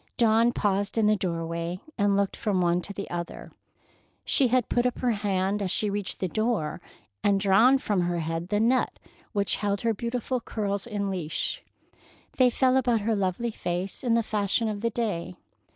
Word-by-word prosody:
Dawn 230 +1 +4
paused 200 -2 0
in 220 - +3
the 215 0 +4
doorway 170 -1 -3 0.2
and 200 -2 +2
looked 200 -1 0
from 200 -3 0
one 175 0 +2
to 200 - -7
the 200 0 -5
other. 170 -1 -5 0.7
She 270 - +4
had 250 -1 +2
put 245 0 +2
up 250 - -3
her 250 -2 +1
hand 200 -1 0
as 195 - -1
she 205 +3 0
reached 200 -1 -3
the 185 - 0
door, 215 -5 -1 0.4
and 200 -1 +3
drawn 220 +7 +5
from 205 -8 0
her 175 0 0
head 165 +2 -3
the 205 - +1
net 245 +4 +2 0.3
which 200 -2 +1
held 200 -1 -1
her 230 -1 +1
beautiful 240 +3 -2
curls 205 -3 -3
in 200 -3 -2
leash. 160 -4 -3 0.7
They 255 -1 +6
fell 260 +1 +3
about 240 -4 +2
her 220 +2 +1
lovely 200 +4 -1
face 180 +1 -4
in 235 -2 +2
the 230 - +2
fashion 210 +1 0
of 210 -2 -3
the 230 - +1
day. 205 - -3
205 Hz, 185 wpm, -27 LUFS, 185-230 Hz, 0.7 s, They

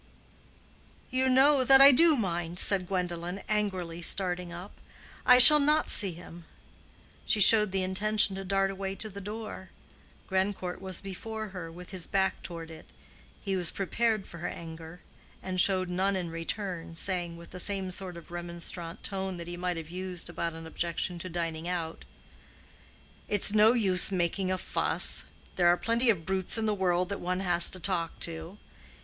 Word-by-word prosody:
"You 260 +1 +1
know 265 +1 +4
that 270 +1 +6
I 275 +1 +9
do 320 +4 +5
mind," 175 -6 -3
said 185 -1 +5
Gwendolen, 180 0 -4
angrily, 185 -5 -3
starting 180 -1 0
up. 175 +4 -9 0.6
"I 250 0 +8
shall 300 +4 +12
not 300 +2 +2
see 195 -4 +1
him." 170 0 -13 0.8
She 215 - +2
showed 210 0 +6
the 190 0 -1
intention 200 +2 +2
to 195 - -6
dart 195 0 0
away 195 0 -5
to 215 +2 -4
the 200 0 -9
door. 210 -2 -8 0.6
Grandcourt 190 -1 -3
was 190 -2 -4
before 215 +3 -7
her, 180 -3 -8
with 180 +2 -12
his 185 -3 -4
back 190 -1 -1
toward 165 -2 -8
it. 160 - -13 0.6
He 195 -1 -2
was 180 -3 +1
prepared 215 +1 -1
for 170 - -12
her 175 - -4
anger, 165 +1 -10 0.4
and 185 -1 -1
showed 185 -1 +1
none 190 +2 -1
in 175 -3 -4
return, 165 0 -5
saying, 175 -1 -3
with 170 0 -14
the 180 - -9
same 195 0 +2
sort 180 -1 -5
of 170 - -14
remonstrant 170 0 -7
tone 190 -2 -4
that 170 - -8
he 175 +1 -7
might 180 0 -3
have 165 0 -8
used 180 -1 -6
about 170 -1 -4
an 165 0 -10
objection 170 +2 -3
to 185 - -6
dining 165 -1 -4
out, 170 -2 -5 1.2
"It's 205 0 +2
no 215 +2 +5
use 195 -6 +1
making 185 +1 -1
a 185 - -1
fuss. 65 - +1 0.3
There 175 -1 +3
are 175 +1 +4
plenty 235 +4 0
of 175 -8 0
brutes 190 +2 -2
in 225 - -2
the 215 - 0
world 180 -2 0
that 200 - -4
one 185 +1 -3
has 175 -2 +3
to 185 - -8
talk 170 -2 -2
to. 165 +3 -4
185 Hz, 175 wpm, -28 LUFS, 175-200 Hz, 1.2 s, shall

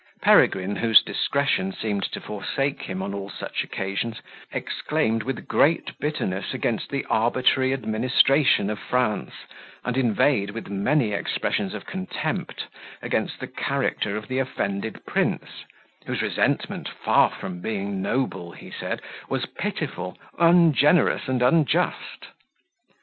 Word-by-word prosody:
Peregrine, 95 +2 +4
whose 115 -2 +6
discretion 140 -9 0
seemed 100 0 -2
to - - -4
forsake 135 +7 -2
him 95 0 -4
on 100 - -4
all 100 0 -5
such - - -4
occasions, 100 +4 -3 0.3
exclaimed, 110 +1 -1
with 135 +4 -5
great 165 +3 +2
bitterness, 130 -8 -2
against 120 -3 -1
the 140 -1 -2
arbitrary 130 +3 +2
administration 130 -1 +3
of 105 - -4
France, 125 -4 0 0.5
and 125 - -1
inveighed, 115 -3 +2
with 110 0 -7
many 110 +5 +1
expressions 100 - -1
of - - -7
contempt, 95 0 -4 0.4
against - - -1
the - - -4
character 105 0 -1
of 110 -1 -7
the 130 +1 -1
offended 110 -5 -3
prince, - - -2 0.4
whose - - -1
resentment, - - 0
far - - +3
from 90 -2 -7
being 100 -1 -3
noble, 95 -7 -2
he - - -12
mid, - - -3 0.3
was - - -1
pitiful, 90 0 -4 0.2
ungenerous, 165 -3 +5
and 130 -1 +1
unjust. 145 +4 +1
110 Hz, 125 wpm, -24 LUFS, 100-135 Hz, 0.5 s, whose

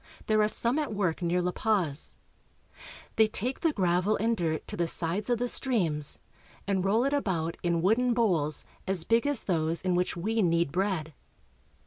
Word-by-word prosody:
There 215 0 +2
are 210 - +3
some 235 +6 +2
at 295 -6 -3
work 185 -4 -1
near 175 +1 0
La 180 - 0
Paz. 180 -9 -1 1.0
They 220 - +5
take 240 +5 -4
the 330 - +1
gravel 185 -2 +1
and 230 +2 0
dirt 160 -5 -2
to - - -6
the 170 -1 -1
sides 175 +6 +1
of 240 - +2
the 245 +2 -1
streams, 175 - +2 0.5
and 195 -2 0
roll 210 +5 +2
it 275 +2 0
about 170 - -1
in 170 -1 0
wooden 235 +5 +2
bowls 170 -11 0 0.2
as 190 -3 +2
big 230 +8 +1
as 285 -5 +3
those 165 -2 0
in 185 -1 0
which 180 0 -1
we 220 +6 -1
knead 170 -4 +1
bread. 180 -4 -2
190 Hz, 180 wpm, -28 LUFS, 170-225 Hz, 1.0 s, They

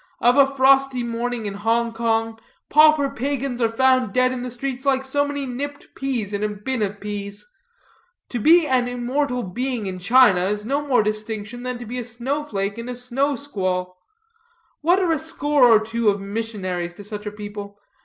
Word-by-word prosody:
Of 245 +1 +4
a 280 -1 +6
frosty 270 -1 +3
morning 235 0 -3
in 200 - -3
Hong 230 +3 0
Kong, 225 -1 -1 0.3
pauper 305 -1 +6
pagans 270 -1 -3
are 230 - +3
found 255 -2 +2
dead 255 0 +3
in 255 -1 -4
the 250 - -4
streets 255 +2 -5
like 265 -1 +1
so 285 +2 +1
many 285 -1 -3
nipped 285 +3 -6
peas 245 -7 -3
in 200 - -2
a 210 - 0
bin 215 +4 -3
of 205 -1 -2
peas. 205 0 -5 0.8
To 245 - -3
be 330 +8 +6
an 255 -3 +1
immortal 245 +1 -1
being 240 +4 -3
in 185 -1 -4
China 205 -3 +5
is 210 +2 -2
no 280 +5 0
more 250 -5 +3
distinction 215 +2 -4
than 250 0 -4
to 240 - -8
be 245 +3 -5
a - - -3
snow 245 +5 -3
flake 200 -5 -3
in 230 +2 -6
a 250 - -4
snow 260 +4 -1
squall. 185 -8 -3 0.9
What 345 +4 +4
are 360 -3 +1
a 320 - +1
score 295 -3 +2
or 225 -2 +7
two 225 0 0
of 200 0 0
missionaries 195 -4 -4
to 205 - -11
such 210 0 -6
a - - -3
people? 205 -1 -8
240 Hz, 195 wpm, -22 LUFS, 210-265 Hz, 0.9 s, or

